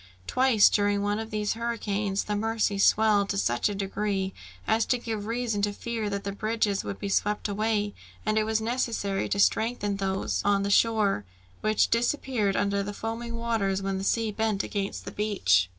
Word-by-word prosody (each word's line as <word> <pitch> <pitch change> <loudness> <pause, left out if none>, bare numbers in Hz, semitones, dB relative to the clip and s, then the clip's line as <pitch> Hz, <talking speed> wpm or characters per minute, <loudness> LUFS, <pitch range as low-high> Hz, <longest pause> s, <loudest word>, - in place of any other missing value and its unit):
Twice, 255 - +5
during 205 -1 +2
one 205 +1 0
of 225 0 -5
these 210 -1 -1
hurricanes, 210 -4 -2
the 210 - -2
Mercy 215 -1 0
swelled 205 -1 +4
to 200 - -1
such 120 - +1
a 205 - -3
degree 195 -1 -2 0.3
as 220 +1 +2
to 250 - +2
give 220 -3 -4
reason 230 -3 -1
to 205 0 +1
fear 225 0 -3
that 200 0 -3
the 200 - -3
bridges 215 -1 0
would 200 - -5
be 200 - -4
swept 205 +2 0
away, 210 0 0 0.3
and 215 - +1
it 215 - +3
was 220 0 0
necessary 225 -4 -1
to - - 0
strengthen 205 -1 +1
those 195 -1 -1
on 200 -1 +2
the 200 - -1
shore, 210 - +3 0.4
which 215 0 +2
disappeared 235 -4 +1
under 200 0 +1
the 205 +1 -4
foaming 230 +2 -4
waters, 220 -5 -1
when 195 0 -1
the - - -4
sea 225 +2 +1
beat 215 -2 0
against 200 -1 -4
the - - -5
beach. 95 - +2
210 Hz, 185 wpm, -27 LUFS, 200-225 Hz, 0.4 s, Twice